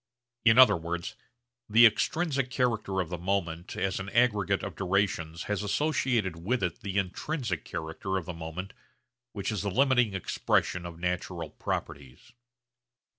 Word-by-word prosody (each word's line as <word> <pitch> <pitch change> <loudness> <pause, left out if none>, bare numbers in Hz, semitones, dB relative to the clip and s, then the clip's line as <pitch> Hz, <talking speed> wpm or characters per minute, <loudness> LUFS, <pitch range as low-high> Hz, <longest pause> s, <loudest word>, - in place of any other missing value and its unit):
In 115 0 +6
other 130 -6 +8
words 85 0 -4 0.5
the 115 +3 +8
extrinsic 135 +3 +2
character 115 -7 0
of 85 - -5
the 90 -1 -4
moment 85 -2 -2
as 95 -1 -1
an 95 0 -5
aggregate 105 -5 +2
of 100 -4 -5
durations 90 -3 -1
has 105 -1 -2
associated 120 - 0
with 105 +7 -1
it 90 -2 -2
the 100 0 -3
intrinsic 100 - -2
character 85 +3 -4
of 90 - -4
the 90 - -5
moment 85 +4 -6 0.6
which 100 +1 -3
is 105 - -2
the 100 - -1
limiting 125 -2 +3
expression 90 -1 0
of 85 -1 -9
natural 90 0 -3
properties. 65 -3 -5
95 Hz, 145 wpm, -29 LUFS, 85-115 Hz, 0.6 s, other